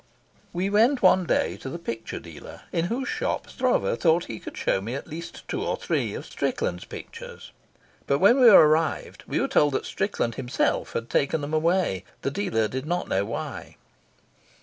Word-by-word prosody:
We 180 +2 -1
went 225 +6 +3
one 185 -1 +5
day - - +1
to 135 - -7
the 150 - -5
picture 115 -9 -5
dealer - - -11
in 165 - 0
whose 245 +8 -2
shop - - -2
Stroeve 255 -1 0
thought 165 0 +3
he 110 -2 -7
could - - -9
show 95 - +1
me 115 +6 -4
at 140 - -5
least 165 +2 -8
two - - -3
or - - -1
three - - -1
of - - -6
Strickland's - - -2
pictures, 480 +1 -10 0.6
but 140 - +3
when 205 - +5
we 245 -2 +9
arrived 160 -4 +4
were - - 0
told 145 -2 +3
that - - -1
Strickland 190 - -1
himself 125 -1 -1
had 115 - -3
taken 140 +5 +1
them 145 +2 -5
away. 165 - +1 0.2
The 140 - 0
dealer 145 - 0
did 130 +5 -5
not 175 +2 -1
know 95 +1 +1
why. 115 - -6
165 Hz, 180 wpm, -25 LUFS, 130-195 Hz, 0.6 s, we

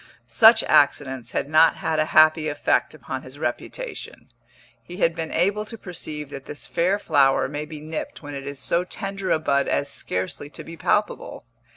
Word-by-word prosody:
Such 225 0 +6
accidents 135 -3 +2
had - - -1
not 155 +2 +5
had 160 -1 -1
a 155 - +3
happy 155 0 +5
effect 145 - 0
upon - - -6
his - - -12
reputation; - - -5 0.5
he 175 - -10
had 165 -4 +2
been 165 -1 -4
able 200 +5 +1
to 230 +1 -8
perceive 155 -6 -7
that 135 -1 -8
this 145 - -7
fair 185 +4 +1
flower 140 -10 +3
may 145 +2 -5
be 155 0 -9
nipped 155 +1 -6
when 145 0 -7
it 140 0 -6
is 140 -1 -5
so 170 +4 +1
tender 195 0 -4
a - - +4
bud 140 -3 +1
as 140 - 0
scarcely 95 +10 -4
to - - -9
be 165 - -9
palpable. 215 - -1
155 Hz, 185 wpm, -23 LUFS, 145-180 Hz, 0.5 s, Such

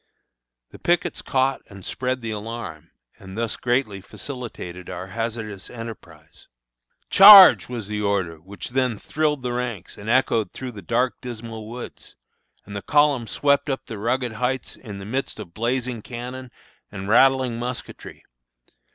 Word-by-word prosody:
The - - -13
pickets 175 0 0
caught 135 0 0
and 100 -2 -12
spread 130 0 -2
the 115 -1 -4
alarm, 105 -7 -6 0.3
and 95 +2 -10
thus 115 -1 -1
greatly 120 -5 -1
facilitated 100 -7 -7
our 90 0 -5
hazardous 110 -1 -5
enterprise. 90 -10 -11 0.6
"Charge!" 195 -6 +10
was 120 -5 -5
the 105 0 -3
order 95 -5 0
which 95 +6 -9
then 125 -3 0
thrilled 150 +3 -1
the 125 -1 -2
ranks 120 -8 -5
and 105 +2 -7
echoed 115 -5 +2
through 130 -1 -6
the 105 -4 -10
dark, 120 +7 0
dismal 115 -3 -7
woods, 120 +1 -9 0.5
and 100 - -9
the 100 - -3
column 145 -4 +2
swept 140 +3 +1
up 135 - -3
the 110 - -7
rugged 120 +3 -1
Heights 125 +4 -2
in 105 -5 -9
the 100 - -8
midst 130 +2 -3
of 90 -5 -9
blazing 120 +1 -2
cannon 125 +2 -7 0.4
and 95 -1 -6
rattling 130 +1 +4
musketry. 125 +1 -7
115 Hz, 150 wpm, -23 LUFS, 100-130 Hz, 0.6 s, Charge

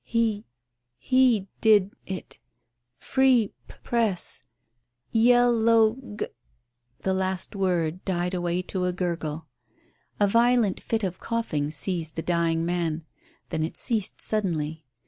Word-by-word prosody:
"He 225 -3 -1 0.5
he 250 - +3
did 210 -3 +4
it. 190 -1 -7 0.6
Free 260 -5 +2
P - - -13
Press. 225 -6 -1 0.7
Yell 240 0 +4
ow 225 -1 +5 0.2
G - - 0 0.4
" 120 0 -49
The 190 - +1
last 190 +1 -2
word 180 -3 0
died 180 -1 -1
away 175 0 -1
to 180 0 -2
a 180 - 0
gurgle. 165 -4 -3 0.7
A 205 - +4
violent 230 -2 +3
fit 225 -1 -2
of 185 -2 -3
coughing 155 -11 -2
seized 160 +1 -2
the 165 - -3
dying 165 -1 +1
man, 165 -2 -2 0.4
then 160 - -2
it 160 - -3
ceased 220 -5 0
suddenly. 160 -8 +1
190 Hz, 125 wpm, -26 LUFS, 165-225 Hz, 0.7 s, ow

